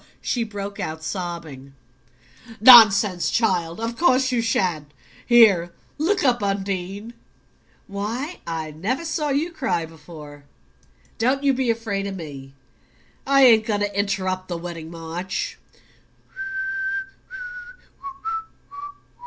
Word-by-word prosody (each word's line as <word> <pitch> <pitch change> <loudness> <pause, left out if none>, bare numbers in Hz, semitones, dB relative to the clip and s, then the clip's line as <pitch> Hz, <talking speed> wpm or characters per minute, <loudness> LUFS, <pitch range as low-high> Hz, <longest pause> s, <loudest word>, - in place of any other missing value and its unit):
she 240 - -1
broke 205 -2 -7
out, 160 0 -5
sobbing. 160 -7 -6 0.8
"Nonsense, 215 -5 +8
child! 180 -7 0
Of 230 +1 -3
course 260 -3 +3
you 245 -2 +1
shan't. 175 -10 -1 0.4
Here, 200 -8 +5 0.3
look 375 +6 +1
up. 245 -4 +2
Undine 195 +2 -3 0.7
why, 230 - -5
I 160 -2 -4
never 220 - -3
saw 310 -2 -2
you 295 +5 0
cry 260 - -1
before. 150 -3 -13 0.7
Don't 260 +5 +1
you 275 -1 +3
be 255 -1 -1
afraid 220 -4 -2
of 195 - -5
me 140 -6 -9 0.7
I 275 0 +5
ain't 225 -4 +6
going 205 -2 0
to 205 -1 -2
interrupt 185 -2 -1
the 175 - -4
wedding 165 -2 -7
march." 170 +2 -5
200 Hz, 110 wpm, -23 LUFS, 170-240 Hz, 0.8 s, Nonsense